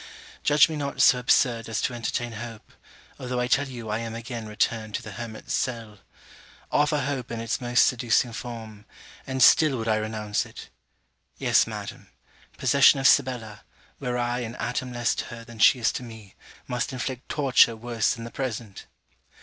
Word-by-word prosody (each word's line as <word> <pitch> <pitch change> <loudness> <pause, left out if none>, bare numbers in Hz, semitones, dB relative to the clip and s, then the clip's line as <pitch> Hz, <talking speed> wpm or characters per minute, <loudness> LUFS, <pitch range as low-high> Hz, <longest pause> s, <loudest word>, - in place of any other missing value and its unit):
Judge 145 0 +5
me 160 - -5
not 140 -2 -4
so 125 - +6
absurd 120 -2 +2
as 110 -2 -1
to - - -1
entertain 120 0 -3
hope, 115 0 -9 0.5
although 125 -1 -3
I 125 - +1
tell 135 +3 +2
you 120 -4 -8
I 105 +1 -1
am 115 -1 -5
again 115 -1 -6
returned 110 0 -1
to - - -4
the 110 - -8
hermit's 110 +2 -7
cell. 115 -5 -3 0.7
Offer 150 0 +2
hope 135 -2 -3
in 115 - -4
its 115 +3 -2
most 120 0 +4
seducing 120 -1 +1
form; 110 -3 -8 0.4
and 130 -1 +1
still 150 -5 +6
would 115 -1 -4
I 110 -1 +2
renounce 110 -1 -2
it. - - -12 0.7
Yes, - - +3
Madam: - - -8 0.5
possession 140 0 +5
of 135 - +4
Sibella, 125 -6 +2 0.4
were 125 -1 -2
I 120 0 -1
an 120 -1 -5
atom 125 +1 -3
less 120 -1 0
to - - -4
her 115 0 -9
than 115 -1 -13
she 130 - +6
is 115 - +1
to - - -5
me, 110 -5 -11 0.3
must 125 +1 -2
inflict 130 0 -5
torture 130 -5 +4
worse 115 0 -1
than 115 - -8
the 115 - -8
present. 115 -6 -5
120 Hz, 180 wpm, -25 LUFS, 110-125 Hz, 0.7 s, so